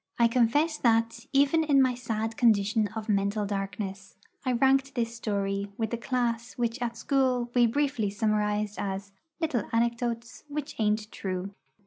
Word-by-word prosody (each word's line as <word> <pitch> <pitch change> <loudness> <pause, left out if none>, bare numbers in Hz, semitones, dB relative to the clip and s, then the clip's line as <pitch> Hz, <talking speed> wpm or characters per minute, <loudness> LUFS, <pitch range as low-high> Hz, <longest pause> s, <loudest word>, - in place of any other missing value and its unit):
I 235 - +5
confess 255 +7 +2
that, 230 -1 +1
even 285 +4 +4
in 285 -3 +4
my 260 -1 +4
sad 225 -2 -3
condition 215 -2 +3
of 220 0 -5
mental 200 0 +1
darkness, 195 -1 -4 0.3
I 255 - +1
ranked 270 +2 +3
this 235 -1 -1
story 200 -3 -2
with 220 -2 -2
the 235 - -1
class 235 0 -1
which 235 +1 -2
at 235 -1 -2
school 250 -1 +1
we 240 -1 +5
briefly 255 -4 0
summarised 210 0 0
as 195 0 -4 0.3
'little 290 - -1
anecdotes 235 +1 -1
which 295 0 -4
ain't 215 0 0
true.' 185 0 -4
230 Hz, 150 wpm, -28 LUFS, 210-250 Hz, 0.3 s, I